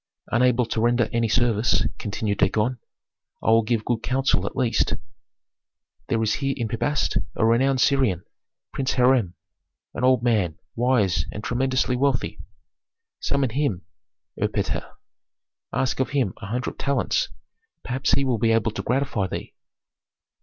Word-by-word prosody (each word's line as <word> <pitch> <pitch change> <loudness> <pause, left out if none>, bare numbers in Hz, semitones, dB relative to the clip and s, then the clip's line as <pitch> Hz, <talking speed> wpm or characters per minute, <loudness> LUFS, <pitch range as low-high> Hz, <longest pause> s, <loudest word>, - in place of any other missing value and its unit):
"Unable 125 +1 +3
to 110 - -2
render 120 0 +3
any 115 -1 +2
service," 120 0 +2
continued 105 -2 -2
Dagon, 120 +3 +1 0.6
"I - - +3
will 115 0 +6
give 110 -1 -1
good 120 -2 0
counsel 135 +2 +1
at - - -6
least. 120 -4 +1 1.1
There 115 -1 +1
is 110 -1 +1
here 135 -1 0
in 120 -3 -1
Pi 110 - -3
Bast 145 +3 0 0.2
a 110 - +2
renowned 130 +3 +3
Syrian, 130 -12 +2 0.5
Prince 135 0 -1
Hiram, 125 -8 +3 0.6
an - - -4
old 130 -2 +4
man, 105 -9 +1 0.2
wise 115 -7 +2
and 105 - -7
tremendously 130 +1 0
wealthy. 135 -1 0 0.8
Summon 140 -4 0
him, 125 -8 -1 0.6
Erpatr, - - -1 0.8
ask 130 0 -1
of 130 - +1
him 135 -10 0
a 100 - -6
hundred 125 +4 -3
talents; 135 -7 0 0.5
perhaps 130 +2 -1
he 140 - +3
will 125 -4 0
be 115 +1 +3
able 115 -1 +2
to - - -4
gratify 125 -6 0
thee." - - -6
120 Hz, 145 wpm, -24 LUFS, 110-130 Hz, 1.1 s, will